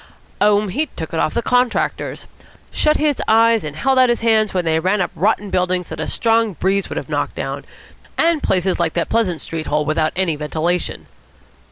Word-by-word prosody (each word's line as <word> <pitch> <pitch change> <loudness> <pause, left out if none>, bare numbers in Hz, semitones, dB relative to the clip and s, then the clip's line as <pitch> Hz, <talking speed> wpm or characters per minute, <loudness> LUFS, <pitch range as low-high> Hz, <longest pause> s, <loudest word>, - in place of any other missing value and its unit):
"Oh, 205 0 +4
he 285 +11 -1
took 160 - -8
it 165 - -1
off - - 0
the 235 - 0
contractors. 250 0 0 0.5
Shut 305 0 +2
his 295 -2 0
eyes 225 0 +4
and 150 -2 -6
held 265 - +2
out 255 -1 +5
his 240 - 0
hands 220 -2 +3
when 180 -2 -1
they 160 0 +2
ran 190 +5 +1
up 180 - -1
rotten 205 +2 0
buildings 180 -1 0
that - - -7
a - - -3
strong 225 -2 +1
breeze 195 +5 0
would - - -5
have - - -4
knocked - - -2
down, - - -5 0.5
and 330 -2 +2
places 185 -1 0
like 170 -2 0
that 170 - -1
Pleasant 190 -8 0
Street 160 -1 -5
hole 150 0 0
without 155 0 0
any 180 -3 0
ventilation." 160 +4 -2
190 Hz, 200 wpm, -19 LUFS, 165-230 Hz, 0.5 s, out